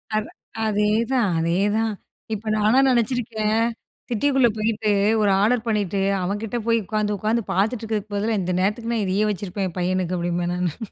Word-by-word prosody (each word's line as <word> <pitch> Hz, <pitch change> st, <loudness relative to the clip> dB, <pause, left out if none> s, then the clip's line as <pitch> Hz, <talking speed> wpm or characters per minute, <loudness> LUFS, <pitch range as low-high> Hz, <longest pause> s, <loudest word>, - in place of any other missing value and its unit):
அதா 215 Hz, 0 st, -2 dB, 0.3 s
அதேதான் 215 Hz, +2 st, +1 dB
அதேதான். 205 Hz, +7 st, +1 dB, 0.4 s
இப்போ 215 Hz, +1 st, -5 dB
நான்லாம் 245 Hz, +6 st, +4 dB
நெனச்சிருக்கேன் 225 Hz, -3 st, +1 dB, 0.5 s
சிட்டிக்குள்ள 260 Hz, +1 st, +3 dB
போயிட்டு, 215 Hz, 0 st, 0 dB, 0.3 s
ஒரு 205 Hz, -2 st, +3 dB
ஆர்டர் 230 Hz, +2 st, +2 dB
பண்ணிட்டு, 200 Hz, -3 st, 0 dB, 0.2 s
அவன் 200 Hz, +4 st, -2 dB
கிட்ட 230 Hz, +2 st, -3 dB
போய் 230 Hz, -1 st, +3 dB
உக்காந்து, 210 Hz, 0 st, -1 dB
உக்காந்து 220 Hz, +4 st, 0 dB
பாத்துட்டு 215 Hz, +5 st, +1 dB
இருக்கிறதுக்கு 215 Hz, -2 st, -3 dB
பதிலா, 215 Hz, +1 st, 0 dB
இந்த 180 Hz, 0 st, -2 dB
நேரத்துக்கு 225 Hz, +5 st, -1 dB
நான் 220 Hz, -3 st, 0 dB
இதையே 195 Hz, +3 st, +1 dB
வச்சுருப்பேன் 195 Hz, 0 st, -3 dB
என் 175 Hz, -, -12 dB
பையனுக்கு 180 Hz, 0 st, 0 dB
அப்டிம்பேன் 175 Hz, 0 st, -1 dB
நானு. 180 Hz, -4 st, -2 dB
210 Hz, 155 wpm, -23 LUFS, 195-225 Hz, 0.5 s, நான்லாம்